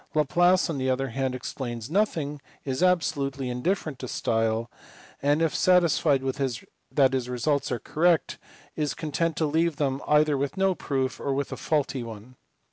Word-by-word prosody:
Laplace 175 +5 +3
on 160 -5 -3
the 130 0 0
other 130 +1 0
hand 130 +1 -2
explains 120 -3 -5
nothing, 160 -7 0 0.2
is 130 +1 -2
absolutely 140 -7 +1
indifferent 150 +2 -2
to 130 - -5
style, 115 0 0 0.5
and, 145 +3 +2
if 160 - +1
satisfied 170 -6 +3
that 135 +1 -1
his 125 -2 -1
results 135 +3 0
are 125 - 0
correct, 165 +5 +1 0.4
is 150 -2 -1
content 165 +1 -1
to 160 - +1
leave 160 +2 +1
them 140 -2 -1
either 150 0 +4
with 140 +6 -2
no 190 0 +3
proof 135 -6 -2
or 140 - -1
with 140 0 -2
a - - -3
faulty 145 -4 -1
one. 115 +2 -9
140 Hz, 160 wpm, -26 LUFS, 130-160 Hz, 0.5 s, either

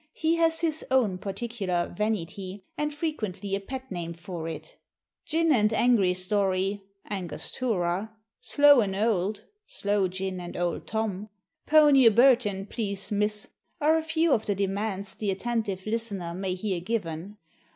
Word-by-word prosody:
He 325 +1 +1
has 325 0 +2
his 315 -2 -1
own 230 -8 +2
particular 195 -4 -3
"vanity," 195 -1 -3
and 300 0 -1
frequently 215 - -4
a 195 - +1
pet 260 +5 -7
name 170 -2 -4
for 170 -1 -6
it. 155 -1 -8 0.5
"Gin 330 0 +2
and 215 -6 +4
angry 220 -5 +3
story" 195 +1 0 0.3
(Angostura), 195 0 -2 0.3
"slow 285 +2 +6
and 195 -3 -1
old" 205 -1 0 0.2
(sloe 205 -1 0
gin 185 0 -4
and 175 -1 -7
Old 175 -1 -2
Tom), 215 -2 -2 0.4
"pony 295 -5 +7
o' - - +10
Burton, 230 -4 +4
please 200 -3 -2
miss," 210 0 -1 0.3
are 310 +1 +4
a 320 - +2
few 320 0 +2
of 220 - 0
the 205 - +1
demands 200 0 -2
the 210 - -3
attentive 200 -2 -2
listener 215 -6 -2
may 185 0 -2
hear 185 -1 -2
given. 185 -1 -4
205 Hz, 145 wpm, -27 LUFS, 185-240 Hz, 0.5 s, o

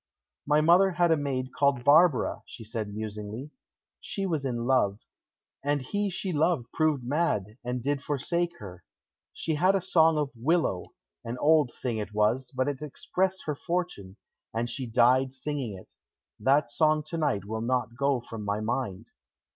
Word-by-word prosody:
"My 150 +1 +4
mother 180 +4 +5
had 175 -1 +3
a - - +6
maid 135 -3 -3
called 140 -3 +2
Barbara," 150 -1 +4
she 115 - -10
said 110 -1 -4
musingly. 105 +5 -6 0.5
"She 195 - -3
was 160 -7 -1
in 120 -2 -2
love, 115 -6 +2 0.6
and 145 +1 +1
he 205 +10 -2
she 185 0 -3
loved 150 -5 +1
proved 155 -5 +1
mad, 125 - -1
and 125 0 -3
did 140 0 0
forsake 170 +5 -1
her. 90 -3 -10 0.5
She 160 - -3
had 185 +6 +3
a - - +3
song 165 -3 +3
of 145 -2 -1
'willow': 130 - 0 0.4
an 120 +2 -5
old 150 -3 +4
thing 120 -3 -3
it 105 0 -6
was, 115 +5 +1
but 130 +1 +1
it 145 -1 -3
expressed 185 +5 -2
her 150 - -1
fortune, 145 - -4 0.4
and 115 +1 0
she 130 +1 -4
died 125 +3 +3
singing 130 -6 -4
it; 95 - -15 0.5
that 135 -2 +3
song 155 +2 +2
to 165 +2 -5
night 135 - 0
will 110 +2 -4
not 125 0 -1
go 140 -1 +1
from 115 -2 -8
my 100 +1 -1
mind." 110 -3 -3
135 Hz, 170 wpm, -28 LUFS, 115-155 Hz, 0.6 s, a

